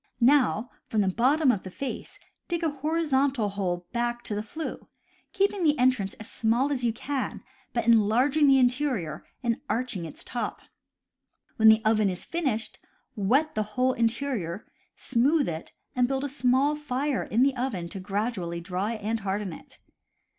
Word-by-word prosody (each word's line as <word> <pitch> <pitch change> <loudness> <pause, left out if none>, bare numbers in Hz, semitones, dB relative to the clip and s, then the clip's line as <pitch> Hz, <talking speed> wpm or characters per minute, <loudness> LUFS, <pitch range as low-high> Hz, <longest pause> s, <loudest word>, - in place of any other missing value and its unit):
Now, 250 -2 +3 0.2
from 215 - +1
the 195 - +1
bottom 260 - +3
of 205 - -2
the 185 - -8
face, 270 +9 -6 0.3
dig 340 -1 -2
a 320 - +1
horizontal 280 -6 +1
hole 180 -3 -2
back 240 0 -1
to - - -2
the 205 - -1
flue, 310 +9 -6 0.4
keeping 395 -1 +1
the 300 -2 +3
entrance 250 -6 +2
as 220 - -9
small 240 +5 +1
as 260 -3 -1
you 235 - +2
can, 265 +3 -4 0.3
but 235 -2 -1
enlarging 235 +7 +4
the 270 -1 +6
interior 250 - 0 0.2
and 235 +1 0
arching 225 -7 -2
its 160 - -8
top. 240 - -4 0.9
When 220 - +6
the 220 0 +5
oven 215 -2 +3
is 180 -1 -5
finished, 270 -10 -2 0.4
wet 260 +10 +2
the 215 - 0 0.2
whole 255 +1 +3
interior, 230 -6 -1 0.3
smooth 275 +5 +2
it, 160 -1 -5 0.2
and 250 -1 +3
build 270 +1 -1
a 285 - -2
small 270 +2 +2
fire 285 -1 -1
in 235 +4 +1
the 275 0 +2
oven 240 -9 -2
to 195 - -6
gradually 195 -3 -2
dry 185 +5 -2
and 220 +1 -2
harden 200 -2 -2
it. - - -13
240 Hz, 165 wpm, -27 LUFS, 210-275 Hz, 0.9 s, the